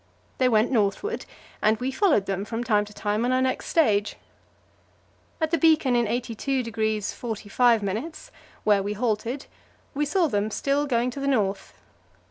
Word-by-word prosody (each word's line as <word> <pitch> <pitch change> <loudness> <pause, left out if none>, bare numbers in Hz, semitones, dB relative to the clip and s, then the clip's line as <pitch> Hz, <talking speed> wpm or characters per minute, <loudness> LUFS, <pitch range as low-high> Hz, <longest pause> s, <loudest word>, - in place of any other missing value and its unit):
They 255 -1 +4
went 220 +1 +3
northward, 235 - 0 0.3
and 215 +1 +3
we 255 +2 -2
followed 295 - +2
them 195 0 -2
from 225 +3 -4
time 210 -4 +2
to 210 - -13
time 210 +2 -1
on 245 - +1
our 255 - +2
next 260 0 -1
stage. 210 -11 +2 1.2
At 315 -1 0
the 335 - +2
beacon 310 -6 +4
in 240 -2 +2
82° 230 -3 -2
45', 225 - -1 0.3
where 205 -2 +3
we 205 +1 -3
halted, 230 +4 -2 0.5
we 295 +1 0
saw 360 +3 +2
them 210 -7 0
still 280 +6 0
going 245 -1 +1
to 275 - -7
the 275 - -2
north. 205 -7 -1
235 Hz, 155 wpm, -25 LUFS, 210-275 Hz, 1.2 s, They